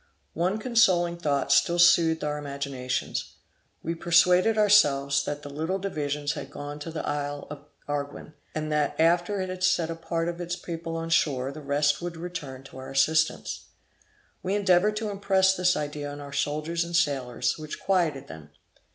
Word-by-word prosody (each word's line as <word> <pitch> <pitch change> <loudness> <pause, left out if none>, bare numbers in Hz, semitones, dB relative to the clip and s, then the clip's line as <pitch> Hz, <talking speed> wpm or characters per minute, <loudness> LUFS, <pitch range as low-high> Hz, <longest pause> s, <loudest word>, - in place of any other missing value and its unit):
One 185 +5 0
consoling 190 -7 +3
thought 145 -4 0
still 170 - +4
soothed 165 -2 +5
our 150 0 -2
imaginations. 140 -3 -4 0.5
We 165 - -2
persuaded 180 +5 +4
ourselves 140 -10 +4
that 145 0 -4
the 145 - -7
little 160 +6 -2
divisions 150 -6 -2
had - - -7
gone 145 +1 -7
to 150 - -6
the 160 - -5
isle 145 0 -3
of 145 -1 -9 0.2
Arguin, 145 +1 -4 0.2
and 155 0 -3
that 150 0 0
after 175 +5 +2
it 185 -1 -3
had 185 0 -5
set 165 -3 +2
a - - -4
part 165 0 -2
of 175 0 -4
its 175 0 -3
people 165 -2 -6
on 165 0 -4
shore, 135 -5 +1
the 155 +2 -9
rest 145 +2 +1
would 175 -1 -5
return 155 -7 -7
to 135 - -12
our 130 - -8
assistance; 155 +4 +1 0.8
we 190 +2 -1
endeavored 200 +1 +3
to 215 -1 -2
impress 190 -1 +2
this 180 0 +2
idea 145 -1 -4
on 145 - -8
our 140 -1 -9
soldiers 155 +4 -1
and 170 0 -5
sailors, 135 -4 0
which 155 -1 -7
quieted 170 -8 0
them. 80 -2 -11
160 Hz, 175 wpm, -26 LUFS, 145-175 Hz, 0.8 s, soothed